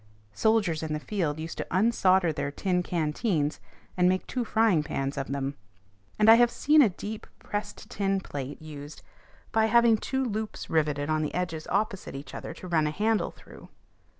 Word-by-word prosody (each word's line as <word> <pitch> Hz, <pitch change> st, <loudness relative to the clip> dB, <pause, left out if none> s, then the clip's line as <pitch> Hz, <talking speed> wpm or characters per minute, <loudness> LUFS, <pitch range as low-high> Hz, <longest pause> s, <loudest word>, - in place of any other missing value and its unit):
Soldiers 205 Hz, -, +2 dB
in 160 Hz, -1 st, -3 dB
the 150 Hz, -, -2 dB
field 160 Hz, -4 st, -2 dB
used 160 Hz, +1 st, -6 dB
to -, -, -3 dB
unsolder 190 Hz, -4 st, +3 dB
their 145 Hz, -1 st, -2 dB
tin 180 Hz, +5 st, 0 dB
canteens, 160 Hz, -1 st, -1 dB, 0.4 s
and 180 Hz, 0 st, +4 dB
make 185 Hz, 0 st, 0 dB
two 250 Hz, -, -2 dB
frying 220 Hz, -7 st, +3 dB
pans 140 Hz, -2 st, -3 dB
of 135 Hz, -, -3 dB
them; 140 Hz, 0 st, -2 dB, 0.6 s
and 215 Hz, -, +3 dB
I 225 Hz, -, +11 dB
have 240 Hz, 0 st, +5 dB
seen 300 Hz, +5 st, +4 dB
a 240 Hz, -, +5 dB
deep 210 Hz, +4 st, -7 dB
pressed 205 Hz, 0 st, -5 dB
tin 195 Hz, -1 st, 0 dB
plate 145 Hz, -6 st, -6 dB
used 150 Hz, -1 st, -10 dB, 0.5 s
by 220 Hz, 0 st, +3 dB
having 235 Hz, 0 st, +5 dB
two 265 Hz, +4 st, -2 dB
loops 215 Hz, -2 st, -4 dB
riveted 150 Hz, -2 st, +1 dB
on 155 Hz, 0 st, +1 dB
the 150 Hz, -, -3 dB
edges 165 Hz, -3 st, -3 dB
opposite 200 Hz, -6 st, -2 dB
each 140 Hz, +1 st, -8 dB
other -, -, -6 dB
to 185 Hz, -, -9 dB
run 160 Hz, -3 st, +2 dB
a -, -, -1 dB
handle 215 Hz, +6 st, +1 dB
through. -, -, -15 dB
180 Hz, 180 wpm, -27 LUFS, 150-215 Hz, 0.6 s, I